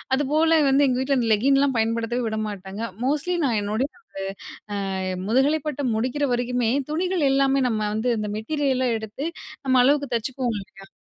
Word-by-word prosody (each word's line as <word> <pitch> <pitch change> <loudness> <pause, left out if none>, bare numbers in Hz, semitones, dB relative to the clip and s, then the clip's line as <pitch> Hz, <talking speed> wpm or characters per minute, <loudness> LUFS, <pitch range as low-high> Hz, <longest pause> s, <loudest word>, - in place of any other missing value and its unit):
அதுபோல 310 +3 +3
வந்து 280 +1 +4
எங்க 250 0 +1
வீட்டுல 275 0 +1
அந்த 230 -2 0
லெக்கின்லாம் 275 +4 +3
பயன்படுத்தவே 230 +2 0
விடமாட்டாங்க. 210 -2 -4 0.2
மோஸ்ட்லி 300 +6 0
நான் 230 -5 +1
என்னுடைய 220 +8 -1 1.1
அ - - -2 0.3
முதுகலை 270 +7 +3
பட்டம் 280 -6 -1
முடிக்குற 260 +5 0
வரைக்குமே, 245 -1 0 0.2
துணிகள் 350 -2 +1
எல்லாமே 275 0 +3
நம்ம 215 -2 -1
வந்து 235 +3 0
இந்த 210 -1 -3
மெட்டீரியலா 260 +1 0
எடுத்து 220 +6 -6 0.4
நம்ம 260 - +2
அளவுக்கு 285 +1 +2
தச்சுக்குவோம் 245 0 -2
இல்லயா? 195 0 -16
255 Hz, 145 wpm, -24 LUFS, 225-280 Hz, 1.1 s, வந்து